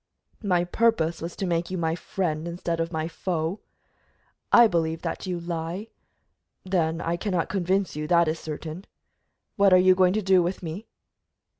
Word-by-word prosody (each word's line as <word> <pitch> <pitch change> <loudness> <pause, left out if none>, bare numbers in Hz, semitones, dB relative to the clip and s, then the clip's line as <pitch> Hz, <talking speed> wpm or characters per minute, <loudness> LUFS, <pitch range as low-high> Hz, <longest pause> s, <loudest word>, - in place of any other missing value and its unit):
"My 180 -5 +2
purpose 175 -4 +1
was 170 +1 -5
to 195 - -3
make 170 -1 -1
you 185 - -3
my 160 -2 0
friend 170 -2 -3
instead 170 -1 -3
of 165 +1 -1
my 160 -1 -2
foe." 170 +1 -3 0.9
"I 240 - +8
believe 165 -5 0
that - - -4
you 180 -1 -2
lie 170 +5 -4 0.4
" - - -51
"Then 165 -2 +1
I 170 0 -1
cannot 180 -2 -1
convince 190 -1 0
you, 150 0 -3
that 170 0 +4
is 160 +1 -1
certain. 160 +4 -7 0.7
What 200 -2 +5
are - - +9
you 185 0 +6
going 185 0 +3
to 215 0 -1
do 190 -1 +5
with 180 +2 -3
me?" 170 +7 -6
175 Hz, 175 wpm, -26 LUFS, 165-185 Hz, 0.9 s, are